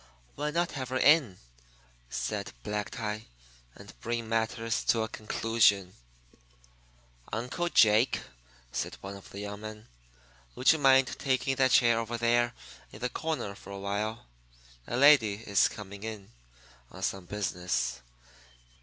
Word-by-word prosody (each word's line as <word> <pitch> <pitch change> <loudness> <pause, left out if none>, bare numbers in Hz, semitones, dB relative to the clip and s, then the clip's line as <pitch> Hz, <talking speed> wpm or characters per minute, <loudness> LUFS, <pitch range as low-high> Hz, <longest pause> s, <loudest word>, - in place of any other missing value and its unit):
"Why 150 +1 -2
not 170 +3 0
have 130 -4 -5
her 130 - -1
in," 140 - +4 0.7
said - - -3
Black 105 0 -3
Tie, 110 -1 -5 0.5
"and - - -13
bring 115 -1 -3
matters 115 +1 -1
to 115 -1 +3
a - - -2
conclusion?" 105 -4 +1 1.4
"Uncle 125 +10 -2
Jake," 110 -3 +4 0.5
said - - -3
one 100 +1 -7
of 100 - -13
the 100 - -7
young 105 0 -6
men, 110 0 -9 0.7
"would 130 - +5
you 160 - -3
mind 135 -1 +5
taking 135 0 0
that 130 -1 +4
chair 120 -2 +5
over 115 +1 -3
there 120 0 +2 0.4
in - - -10
the 125 +1 -1
corner 155 -9 -3
for 100 - -14
a 100 - -6
while? 100 +3 -3 0.6
A 120 - -2
lady 135 -7 +6
is 100 -2 +2
coming 100 -1 -9
in 110 - -7 0.6
on 95 - -10
some 95 -1 -2
business. 90 -11 -2
115 Hz, 140 wpm, -29 LUFS, 100-125 Hz, 1.4 s, lady